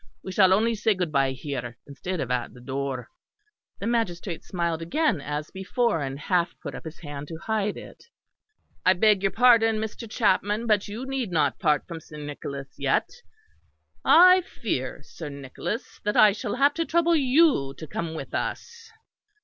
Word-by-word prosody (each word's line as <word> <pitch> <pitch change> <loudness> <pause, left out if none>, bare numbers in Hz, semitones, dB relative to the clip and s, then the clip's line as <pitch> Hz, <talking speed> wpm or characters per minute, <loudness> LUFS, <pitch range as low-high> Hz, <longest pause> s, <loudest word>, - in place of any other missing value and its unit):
We 190 - -6
shall 190 -1 +5
only 220 +4 +3
say 220 -1 +1
good 180 -4 -2
bye 135 -2 +2
here, 125 -3 -5
instead 170 +6 -5
of 125 - -3
at 125 -1 -2
the - - -12
door." 130 -1 -4 0.7
The - - -6
magistrate 195 -7 -2
smiled 170 -3 -2
again 295 - 0
as 150 +2 -4
before; 195 - 0
and 135 -1 -4
half 175 +2 0
put - - -7
up - - -9
his 160 0 -8
hand 145 -2 -7
to 165 - -7
hide 210 +2 -1
it. - - -12 0.8
"I 185 - +6
beg 205 +1 +3
your 195 0 +1
pardon, 230 -2 +5
Mr. 220 +1 -5
Chapman; 210 0 +1
but 210 -3 +2
you 220 +5 -6
need 265 -5 -2
not 165 -3 +1
part 150 -1 +2
from 170 -2 -6
Sir 150 - -12
Nicholas 140 -1 -7
yet. - - +1 0.9
I 365 +2 +7
fear, 140 - -4
Sir 155 0 -8
Nicholas, 140 - -6
that 210 0 0
I 210 - +8
shall 210 +2 -4
have 280 +3 +4
to 330 +1 -1
trouble 340 0 +3
you 265 - +3
to 160 - -7
come 160 +2 -4
with - - -7
us." 470 -1 -4
185 Hz, 175 wpm, -26 LUFS, 145-230 Hz, 0.9 s, I